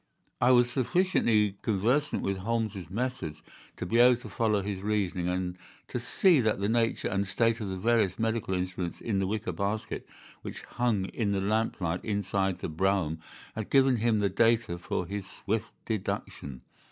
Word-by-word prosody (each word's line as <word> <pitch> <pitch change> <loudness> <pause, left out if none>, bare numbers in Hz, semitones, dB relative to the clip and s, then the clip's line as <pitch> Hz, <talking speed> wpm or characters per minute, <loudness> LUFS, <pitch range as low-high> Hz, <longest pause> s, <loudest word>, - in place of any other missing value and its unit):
I 120 - +5
was 120 -1 +5
sufficiently 115 - +2
conversant 120 +9 +1
with 95 0 -1
Holmes's 105 -3 -2
methods 105 -8 -3 0.3
to - - -4
be 115 +6 +1
able 125 +1 +7
to - - -9
follow 110 -4 +1
his 100 -1 -4
reasoning, 100 -4 -1
and 90 0 -2 0.3
to 125 - -2
see 160 +5 +4
that 110 -3 +1
the 100 - 0
nature 115 +1 +1
and 100 0 -1
state 115 +3 +1
of 100 - -3
the 95 - -3
various 110 -2 +2
medical 110 -4 0
instruments 90 -1 -3
in 105 -4 -1
the 95 - 0
wicker 105 -1 -2
basket 100 +5 -3 0.3
which - - -7
hung 115 -6 0
in 105 -4 -1
the 100 - +1
lamplight 95 -4 -1
inside 100 -2 0
the - - -2
brougham 85 -1 0 0.3
had 110 -1 -5
given 135 -2 +4
him 115 0 +2
the 100 -1 +2
data 115 -3 +2
for 90 - -2
his 100 +1 -5
swift 110 +2 -3
deduction. 70 - -4
105 Hz, 170 wpm, -29 LUFS, 95-115 Hz, 0.3 s, able